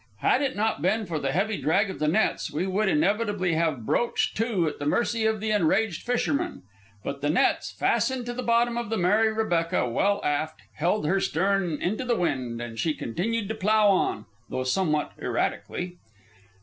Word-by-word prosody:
Had 260 - +3
it 270 -2 -1
not 215 -7 0
been 215 +6 +1
for 165 -4 -3
the 135 -1 -1
heavy 195 +6 0
drag 195 +5 +2
of - - -9
the 150 - +1
nets, 195 +8 +1
we 180 - -1
would 195 +2 +1
inevitably 195 +2 +1
have 160 -8 0
broached 235 - 0
to 215 -7 +1
at 150 - -4
the 145 - -4
mercy 230 +4 +1
of 220 -1 0
the 215 +1 -1
enraged 200 -1 +1
fishermen. 245 - -1 0.4
But 140 0 -5
the 145 - 0
nets, 160 - +2
fastened 260 -2 0
to 240 - -4
the 250 - -4
bottom 235 0 +2
of 235 - -5
the 225 - -1
Mary 210 +5 +3
Rebecca 175 - 0
well 200 +12 +1
aft, 150 +2 -1
held 175 +4 0
her 190 +6 +2
stern 190 -2 0
into 215 +8 -1
the 245 -2 +1
wind, 130 - -1
and 120 -1 -6
she 155 -2 0
continued 205 - -2
to - - -1
plough 215 0 +3
on, 190 - +1 0.2
though 130 0 -2
somewhat 150 +2 0
erratically. 180 0 -2
195 Hz, 190 wpm, -26 LUFS, 155-220 Hz, 0.4 s, Had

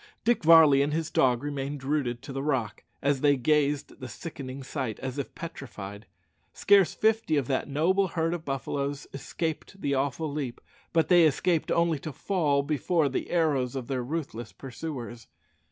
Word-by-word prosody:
Dick 240 -4 +2
Varley 155 -4 +7
and 145 +1 0
his 160 +1 -2
dog 125 -1 +2
remained 140 -1 -4
rooted 135 -4 -1
to 135 -1 -7
the 135 - -3
rock, 130 -7 -2 0.2
as 140 -1 +1
they 145 -1 +4
gazed 145 +2 +1
at - - -18
the 130 - -6
sickening 135 0 -7
sight, 130 -5 -4
as 130 +1 -4
if 140 - -5
petrified. 105 - -8 0.5
Scarce 200 -3 +4
fifty 220 -7 +2
of 140 - +1
that 130 +1 -1
noble 175 +7 +2
herd 165 -1 -1
of 175 -2 -4
buffaloes 140 0 -3
escaped 160 +6 -4
the 140 -6 -1
awful 140 +3 -1
leap, 140 -5 -4 0.3
but 165 -1 +2
they 175 -2 +6
escaped 160 +3 +1
only 170 -3 +2
to 155 - -6
fall 145 -2 0
before 155 +1 +1
the 135 - -3
arrows 145 -7 +1
of 130 -2 -3
their 130 0 -2
ruthless 120 - -5
pursuers. 120 - -7
145 Hz, 170 wpm, -28 LUFS, 130-160 Hz, 0.5 s, Varley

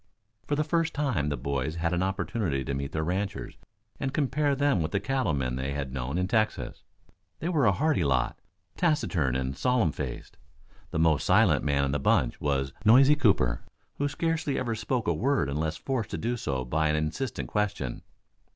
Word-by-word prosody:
For 145 - +1
the 150 - +1
first 165 +1 0
time, 125 - 0
the 70 - -2
boys 70 +2 -2
had 85 +1 -1
an 90 - +1
opportunity 95 -6 -1
to 70 - -3
meet 70 0 -3
the 80 - -1
ranchers 95 +5 -3 0.4
and 135 - -1
compare 145 0 +1
them 140 -9 +2
with 80 - -2
the 100 - +2
cattle 110 - 0
men 65 -2 -1
they 65 +2 -2
tad 70 -2 -4
known 65 +4 -3
in 90 0 0
Texas. 110 0 -1 0.6
They 170 - -3
were 150 -9 +3
a - - +6
hardy 140 - +1
lot, 65 -3 0 0.4
taciturn 95 - +1
and 65 0 -2
solemn 125 - +2
faced. - - -6 0.5
The - - -3
most 80 -3 +3
silent - - +4
man 70 -1 +1
in 70 - 0
the 75 - 0
bunch, 65 -2 +1
was 70 -2 0
Noisy 135 +6 +7
Cooper, 80 - +2 0.4
who 145 - +2
scarcely 155 0 -1
ever 120 -3 -1
spoke 120 +2 -2
a 85 - +3
word 130 - +1
unless 80 +3 -2
forced 125 -9 -2
to - - -3
do 120 +9 -1
so 65 - -2
by 80 +5 +1
an 75 - +2
insistent 80 - -2
question. 105 - -2
90 Hz, 190 wpm, -28 LUFS, -, 0.6 s, Noisy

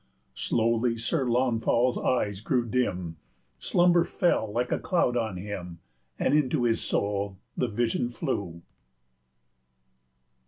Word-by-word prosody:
105 - - -10
Slowly 115 +1 +1
Sir 130 +3 0
Launfal's 120 0 +2
eyes 105 -6 0
grew 120 +2 0
dim, 90 -9 -1 0.4
Slumber 175 - +4
fell 170 - 0
like 120 +3 -1
a - - +1
cloud 170 -9 +1
on 110 -5 -1
him, 90 -3 -6 0.4
And - - +1
into 145 -3 +2
his 115 -1 +2
soul 100 -1 -1 0.2
the 125 - 0
vision 120 +2 0
flew. 100 - -4
115 Hz, 120 wpm, -27 LUFS, 100-125 Hz, 0.4 s, Slumber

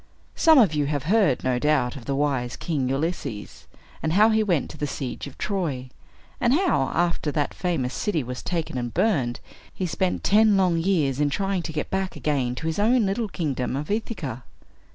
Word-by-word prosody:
Some 320 -2 +6
of 210 -11 +5
you 145 -2 0
have 145 -2 -2
heard, 185 - +2
no 125 -1 +1
doubt, 135 -4 +1
of 130 -4 -9
the 140 - -1
wise 135 -4 0
King 140 -6 -2
Ulysses, 135 -6 -4 0.3
and 160 0 -1
how 210 +4 +6
he 220 0 +3
went 180 -9 0
to - - -11
the 145 - -1
siege 135 0 -5
of 140 - -12
Troy, 145 -11 -3 0.5
and 245 +2 +3
how, 320 - +2
after 170 -3 0
that 145 -2 -1
famous 160 -9 -2
city 170 -9 -1
was 125 +1 -6
taken 165 -7 -3
and 120 -1 -3
burned, 135 - +1 0.3
he 185 - -3
spent 180 +1 -1
ten 210 0 +5
long 180 -3 +2
years 160 -7 +1
in 145 -1 +2
trying 195 +4 -1
to 165 - -5
get 150 -1 -4
back 190 -1 -1
again 130 -5 -1
to 160 - -6
his 160 +3 -1
own 230 +2 +3
little 205 +4 -1
kingdom 135 -8 -2
of 150 +6 -4
Ithaca. 180 - -3
155 Hz, 195 wpm, -24 LUFS, 135-195 Hz, 0.5 s, Some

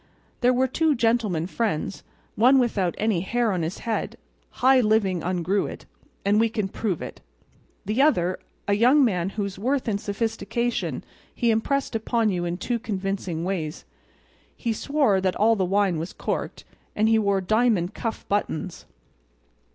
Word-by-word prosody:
There 250 0 +4
were 255 +1 +2
two 310 +3 +1
"gentlemen 225 -8 +1
friends"—one 225 - 0
without 210 -8 +1
any 215 -6 +1
hair 235 +3 0
on 180 -3 -1
his 165 +3 -3
head—high 255 +3 0
living 210 -5 +2
ungrew 185 +2 0
it; - - -10 0.4
and 205 +2 +3
we 225 0 +3
can 215 -3 -2
prove 190 -4 -2
it—the 185 - -6
other 185 - +2 0.3
a 205 - +2
young 255 +7 +5
man 185 -5 0
whose 200 -2 -4
worth 260 +5 0
and 205 -2 -1
sophistication 225 +3 -2 0.3
he 235 -2 +2
impressed 270 +6 0
upon 225 0 +1
you 175 -2 -2
in 175 0 -2
two 235 +5 -2
convincing 195 -6 -3
ways—he 185 +6 -6
swore 270 -6 +1
that 185 -1 0
all 225 +2 +4
the 190 -3 0
wine 195 -3 +1
was 165 +4 -5
corked; - - -4 0.3
and 215 +1 +2
he 225 0 +4
wore 200 -2 +2
diamond 215 -2 +1
cuff 225 -2 -5
buttons. 200 -3 -2
210 Hz, 145 wpm, -25 LUFS, 185-235 Hz, 0.4 s, young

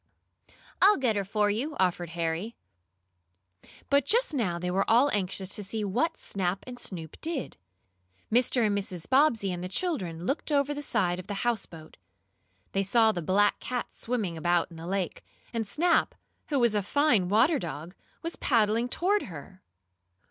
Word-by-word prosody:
"I'll 410 +2 +7
get 250 -6 +1
her 200 - 0
for 205 +1 +1
you," 275 +9 -2
offered 175 -2 +1
Harry. 170 +7 -2 1.4
But 280 0 +5
just 480 -1 +2
now 200 -11 0
they 180 +1 -3
were 195 +2 0
all 245 +6 +5
anxious 190 -1 -1
to 205 - -1
see 215 +2 -3
what 250 - 0
Snap 190 -1 -2
and 250 -1 -9
Snoop 165 -5 -6
did. 320 -5 -4 0.8
Mr. 245 0 +3
and 205 -1 +1
Mrs. 185 -4 -2
Bobbsey 260 -7 +3
and 175 0 -4
the 180 - -4
children 185 - -2
looked 275 - 0
over 285 0 +2
the 290 - -5
side 180 -10 0
of 185 - -9
the 205 +2 -4
houseboat. 195 -9 -3 0.7
They 195 - +1
saw 220 +3 +4
the 175 - -4
black 200 +5 +2
cat 250 -1 -4
swimming 215 -9 -3
about 175 +1 +1
in 165 - -11
the 165 +1 -8
lake, 190 -1 -2 0.3
and 225 -2 -2
Snap, 335 - +2 0.3
who 290 - +1
was 235 -4 +3
a 210 - +1
fine 230 -4 +2
water 255 - +4
dog, 165 0 -6 0.3
was 335 +1 -4
paddling 230 -1 +2
toward 400 +9 +1
her. 185 +2 -10
210 Hz, 170 wpm, -28 LUFS, 180-260 Hz, 1.4 s, I'll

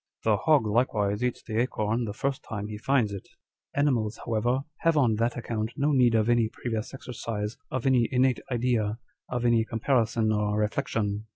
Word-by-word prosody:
The 110 -1 +3
hog 140 +4 +3
likewise 105 -1 +1
eats 125 -1 -1
the 110 0 -1
acorn 115 -1 -1
the 105 - -3
first 135 +5 -2
time 105 -2 -5
he 105 - -5
finds 120 -4 +1
it. 100 - -7 0.5
Animals 125 -7 +1
however 120 +3 +1 0.2
have, 165 -1 +2
on 120 -7 +3
that 115 +2 0
account, 115 -1 -3
no 145 +1 +2
need 125 -4 +4
of 110 -1 +2
any 120 -2 +3
previous 110 -1 -4
exercise, 110 -4 -5
of 130 -1 -3
any 125 -3 +3
innate 130 0 +3
idea, 115 -3 0 0.3
of 125 -1 -2
any 120 -1 +4
comparison 115 -1 +1
or 105 -1 0
reflection. 105 0 -1
115 Hz, 175 wpm, -27 LUFS, 110-125 Hz, 0.5 s, need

